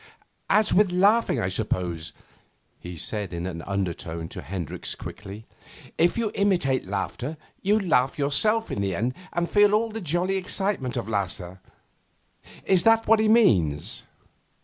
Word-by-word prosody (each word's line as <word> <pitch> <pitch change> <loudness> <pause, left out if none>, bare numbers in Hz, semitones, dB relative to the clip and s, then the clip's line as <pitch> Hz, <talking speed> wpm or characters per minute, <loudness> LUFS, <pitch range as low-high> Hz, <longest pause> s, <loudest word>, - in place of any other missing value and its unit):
'As 215 0 +3
with 200 -1 +4
laughing, 200 - +3
I 90 - -1
suppose?' 90 -5 -2 0.7
he 90 -1 -9
said 105 +4 -4
in 85 +1 -4
an 85 -3 -5
undertone 85 -4 -3
to - - -8
Hendricks 90 -1 -5
quickly. 105 +2 -9 0.5
'If 175 +5 +2
you 225 -3 -1
imitate 175 - +1
a - - -11
laugher, 120 +9 -4 0.2
you 205 +3 +2
laugh 135 -9 +1
yourself 215 +11 +3
in - - -2
the 95 -2 -1
end 120 +7 -1 0.2
and 170 0 -1
feel 205 +1 +4
all 225 +1 0
the 225 +1 -5
jolly 175 +3 0
excitement 185 -9 -1
of 120 - -3
laughter. 95 -3 -3 1.1
Is 190 -2 +3
that 225 +3 +4
what 225 0 +4
he 220 - +2
means? 95 - +3
135 Hz, 150 wpm, -25 LUFS, -, 1.1 s, with